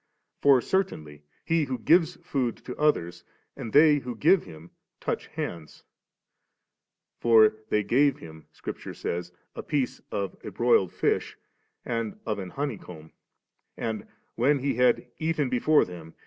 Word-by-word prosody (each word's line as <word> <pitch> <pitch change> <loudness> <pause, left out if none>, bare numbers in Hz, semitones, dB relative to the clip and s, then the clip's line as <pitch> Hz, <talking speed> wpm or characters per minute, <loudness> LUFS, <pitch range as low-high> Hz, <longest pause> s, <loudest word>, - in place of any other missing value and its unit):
For 140 -3 +6
certainly 80 - -2 0.2
he 165 -2 +2
who 130 -2 -3
gives 165 +8 +3
food 125 -5 -1
to 125 - -6
others, 85 - 0 0.3
and 115 - -6
they 150 +2 +6
who 125 -2 -6
give 180 +5 +4
him, 80 +2 -13 0.3
touch - - -3
hands. 80 -3 -6 1.4
For 110 -2 +6
* 110 - -34
they 105 - +2
gave 140 +5 +3
Him,' 80 -1 -12
Scripture - - -7
sajTS, 85 0 -4 0.2
'a - - -5
piece 140 -5 -2
of 100 -1 -3
a - - -5
broiled 100 -3 +2
fish - - -1 0.5
and 115 -3 -3
of 105 -2 -2
an 95 -2 -6
honey 140 -1 -3
comb, 80 -3 -12 0.7
and 110 -2 -4
' - - -44
when 145 +4 +4
He 135 0 -1
had 125 +1 +3
' - - -47
eaten 160 -4 0
before 145 +5 +3
them. 85 -3 -11
120 Hz, 155 wpm, -27 LUFS, 90-145 Hz, 1.4 s, For